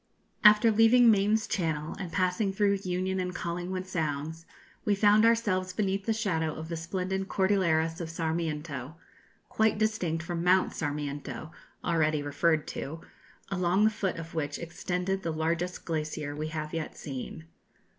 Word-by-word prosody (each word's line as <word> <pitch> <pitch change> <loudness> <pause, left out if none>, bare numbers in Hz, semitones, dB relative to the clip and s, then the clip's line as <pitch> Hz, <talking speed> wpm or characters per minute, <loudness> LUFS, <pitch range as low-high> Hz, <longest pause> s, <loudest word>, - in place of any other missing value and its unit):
After 210 +1 +7
leaving 225 +2 +6
Mayne's 210 +1 +2
Channel, 160 -4 -2
and 180 -4 -5
passing 185 +2 +1
through 200 0 +2
Union 185 +1 -1
and 180 -1 -3
Collingwood 180 +2 -3
Sounds, 160 -2 -3 0.4
we 205 - +2
found 210 +2 +5
ourselves 205 -6 +2
beneath 195 0 -1
the - - +3
shadow 175 -8 0
of 160 +1 -7
the 170 - -2
splendid 185 +3 -3
Cordilleras 175 -4 +1
of 165 - -4
Sarmiento 160 -4 -3 0.5
quite 220 -1 +2
distinct 185 -7 0
from 170 0 -3
Mount 185 +1 +3
Sarmiento, 145 -1 -4 0.3
already 155 -3 +1
referred 155 +2 +1
to 160 +4 -5 0.5
along 185 +1 +2
the 215 - +5
foot 195 -3 -2
of 165 0 -7
which 145 -3 -2
extended 180 +3 -2
the 170 - -3
largest 165 +3 -2
glacier 155 -2 -3
we 155 +1 -3
have 155 -1 -5
yet 165 -2 -4
seen. 140 +3 -6
175 Hz, 145 wpm, -29 LUFS, 160-195 Hz, 0.5 s, After